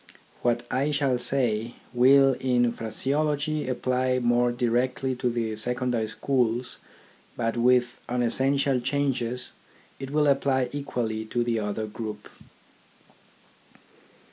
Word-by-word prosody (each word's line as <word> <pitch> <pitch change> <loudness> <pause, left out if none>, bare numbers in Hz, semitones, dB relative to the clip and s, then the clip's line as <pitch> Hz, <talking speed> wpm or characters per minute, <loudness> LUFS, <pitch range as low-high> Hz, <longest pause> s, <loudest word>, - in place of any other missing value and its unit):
What 120 0 0
I 140 +3 +1
shall 140 -4 +1
say, 120 -3 -1 0.2
will 135 +2 +6
in 120 -2 +2
phraseology 145 +6 -1
apply 130 0 0
more 120 0 +2
directly 125 +2 0
to 125 - 0
the 115 -2 -2
secondary 125 0 -1
schools, 125 +1 -1 0.6
but 115 -1 -1
with 120 0 +2
unessential 130 +3 +1
changes 125 -2 -1 0.5
it 135 -1 -6
will 150 +1 +2
apply 135 -2 +2
equally 120 -6 -3
to 120 +2 -1
the 120 -1 0
other 105 +1 -3
group. 105 -1 -7
125 Hz, 110 wpm, -26 LUFS, 120-135 Hz, 0.6 s, will